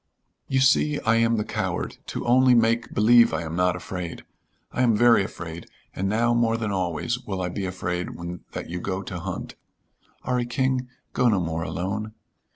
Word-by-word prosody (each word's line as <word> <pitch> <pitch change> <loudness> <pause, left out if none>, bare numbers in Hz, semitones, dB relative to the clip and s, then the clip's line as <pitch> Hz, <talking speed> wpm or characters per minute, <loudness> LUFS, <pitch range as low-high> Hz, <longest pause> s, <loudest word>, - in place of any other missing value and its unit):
"You 130 0 +1
see 145 +3 +3
I 115 +1 +3
am 115 0 +3
the 105 - 0
coward, - - -3
to - - -4
only 125 +1 +5
make 115 0 +2
believe 115 +2 +5
I - - -2
am 80 0 -5
not 90 0 +2
afraid. 90 -2 -6 0.5
I - - -1
am 120 -3 +4
very 120 -3 +5
afraid, 85 -3 -7 0.3
and 95 +1 -1
now 115 +3 +2
more 115 -1 +2
than 110 -3 -2
always 95 +6 -1
will 95 -5 -5
I 90 -1 -1
be 95 +2 -4
afraid 90 -1 -3
when 85 0 -6
that - - -5
you 90 +1 -4
go 95 +1 -3
to 90 -2 -6
hunt. - - -5 0.7
'Arry 125 -1 0
King, 130 0 0 0.2
go 125 -1 +3
no 105 -4 +2
more 80 -2 -2
alone." 105 +6 -3
110 Hz, 185 wpm, -25 LUFS, 90-120 Hz, 0.7 s, only